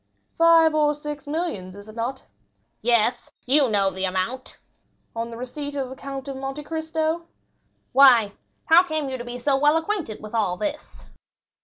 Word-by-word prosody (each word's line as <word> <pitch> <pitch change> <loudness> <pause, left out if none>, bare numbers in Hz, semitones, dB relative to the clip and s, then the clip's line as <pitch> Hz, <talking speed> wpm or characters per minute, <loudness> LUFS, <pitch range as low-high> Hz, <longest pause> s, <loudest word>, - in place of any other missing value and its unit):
"Five 330 -1 +5
or 300 -1 +2
six 295 0 -7
millions, 290 - -3
is 205 +1 -12
it 215 - -12
not?" 245 +3 -4 0.6
"Yes, 235 +1 +1 0.2
you 270 +1 +4
know 200 -2 +2
the 190 0 -3
amount." 190 +8 -3 0.6
"On 230 0 -3
the 230 - -8
receipt 285 +4 -6
of 270 -2 -3
the - - -7
Count 275 0 -7
of 270 -1 -5
Monte 270 +2 -5
Cristo?" 320 +1 -2 0.6
"Why, 250 -6 +6 0.3
how 335 0 +7
came 315 -5 -3
you 260 -1 -4
to - - -5
be 240 0 -6
so 270 +3 +1
well 295 +3 +4
acquainted 325 - -3
with 215 +1 -10
all 205 -6 0
this?" 300 +4 -5
270 Hz, 170 wpm, -24 LUFS, 230-305 Hz, 0.6 s, how